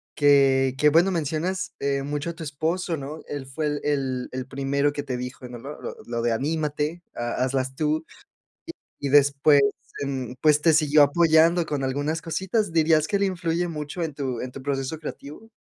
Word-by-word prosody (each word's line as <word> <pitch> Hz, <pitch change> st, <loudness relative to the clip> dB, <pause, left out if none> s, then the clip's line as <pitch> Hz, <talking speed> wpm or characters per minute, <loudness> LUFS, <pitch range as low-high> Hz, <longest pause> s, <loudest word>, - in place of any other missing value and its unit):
que 135 Hz, -2 st, +4 dB
que, 150 Hz, -, +4 dB
bueno, 170 Hz, +5 st, +4 dB
mencionas, 165 Hz, +3 st, -2 dB
eh, 140 Hz, 0 st, -1 dB
mucho 145 Hz, +3 st, -3 dB
a -, -, -10 dB
tu 165 Hz, -1 st, -9 dB
esposo, 160 Hz, +4 st, -2 dB
¿no? 145 Hz, +3 st, -7 dB
Él 145 Hz, -2 st, -5 dB
fue 150 Hz, +3 st, -3 dB
el 145 Hz, 0 st, -2 dB
el 135 Hz, -3 st, -1 dB
el 130 Hz, 0 st, -5 dB
primero 140 Hz, +2 st, 0 dB
que 145 Hz, -, -4 dB
te 130 Hz, -3 st, -3 dB
dijo, 125 Hz, 0 st, -7 dB
¿no? 120 Hz, -, -8 dB
Lo 140 Hz, +4 st, -9 dB
lo -, -, -6 dB
lo 120 Hz, 0 st, -3 dB
de 120 Hz, 0 st, +1 dB
"anímate", 150 Hz, +5 st, -2 dB
"ha 120 Hz, +1 st, -2 dB
hazlas 130 Hz, 0 st, -1 dB
tú" 155 Hz, +2 st, 0 dB, 1.0 s
y 140 Hz, -, -2 dB
después, 145 Hz, +1 st, +5 dB, 0.4 s
em, 130 Hz, -3 st, -3 dB
pues 150 Hz, -1 st, +4 dB
te 165 Hz, -, +5 dB
siguió 150 Hz, -1 st, +5 dB
apoyando 165 Hz, +3 st, +4 dB
con 145 Hz, -3 st, -2 dB
algunas 145 Hz, +5 st, -2 dB
cositas. 190 Hz, +4 st, -1 dB
¿Dirías 155 Hz, -1 st, +3 dB
que 200 Hz, -, +1 dB
él 200 Hz, -, +1 dB
influye 175 Hz, -2 st, -1 dB
mucho 150 Hz, +2 st, -5 dB
en 155 Hz, -, -5 dB
tu 130 Hz, -4 st, -3 dB
en 125 Hz, 0 st, -5 dB
tu 135 Hz, -, -9 dB
proceso 140 Hz, +2 st, -2 dB
creativo? 155 Hz, +8 st, -9 dB
145 Hz, 190 wpm, -25 LUFS, 135-160 Hz, 1.0 s, después